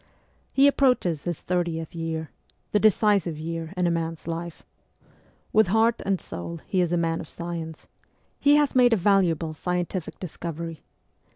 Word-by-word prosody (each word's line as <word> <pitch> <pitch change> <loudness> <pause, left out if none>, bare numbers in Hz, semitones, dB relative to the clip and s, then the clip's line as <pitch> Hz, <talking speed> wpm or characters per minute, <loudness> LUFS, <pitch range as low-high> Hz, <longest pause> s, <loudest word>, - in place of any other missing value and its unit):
He 275 - +5
approaches 250 - +2
his 175 -3 -3
thirtieth 170 -3 -2
year 165 -1 -4 0.4
the 210 - +3
decisive 205 -5 +3
year 165 +1 -5
in 180 - +2
a 170 - +2
man's 165 -1 -3
life. 170 0 -5 0.9
With 215 -2 +5
heart 225 +4 +3
and 195 -2 0
soul 170 0 -7
he 185 - +1
is 175 -2 0
a 175 - +2
man 165 -1 0
of 160 - -10
science; 165 -2 -6 0.5
he 285 +1 +5
has 295 -1 +3
made 245 -2 +5
a - - +4
valuable 175 -5 +2
scientific 180 +1 -3
discovery. 165 -2 -6
170 Hz, 155 wpm, -25 LUFS, 165-200 Hz, 0.9 s, He